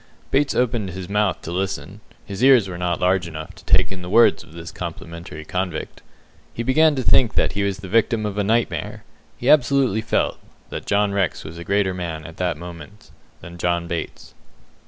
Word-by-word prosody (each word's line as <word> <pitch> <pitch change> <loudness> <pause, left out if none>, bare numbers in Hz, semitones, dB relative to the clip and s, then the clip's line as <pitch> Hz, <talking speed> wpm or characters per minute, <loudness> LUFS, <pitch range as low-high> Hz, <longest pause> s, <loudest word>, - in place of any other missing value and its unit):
Bates 140 +1 +2
opened 115 -5 +1
his 95 0 -6
mouth 105 0 0
to 85 - -5
listen. 95 +2 -3 0.2
His 100 +4 -4
ears 130 -6 +6
were 90 -2 -6
not 90 -1 -1
large 90 -1 +2
enough 80 -1 -7
to - - -16
take - - +3
in 95 -1 -6
the 90 - -7
words 115 +4 +5
of 80 -1 -16
this 85 0 -8
complimentary 85 -2 -7
convict. 90 -2 -4 0.5
He 115 - -2
began 155 +5 +4
to 130 - -1
think 120 -3 +4
that - - +2
he 100 - -2
was 100 -1 0
the 95 -1 -9
victim 110 +2 +2
of 105 -2 -3
a - - +2
nightmare. 115 +3 -1 0.3
He 120 - -4
absolutely 135 -6 +4
felt - - 0 0.3
that - - -6
John 100 0 +2
Rex 100 -3 0
was 80 +2 -9
a - - -6
greater 100 0 +1
man 85 -4 -5
at 80 - -10
that 90 -4 -1
moment 85 +1 -11 0.3
than 85 0 -10
John 85 0 0
Bates. 85 -1 -5
95 Hz, 200 wpm, -22 LUFS, 85-110 Hz, 0.5 s, ears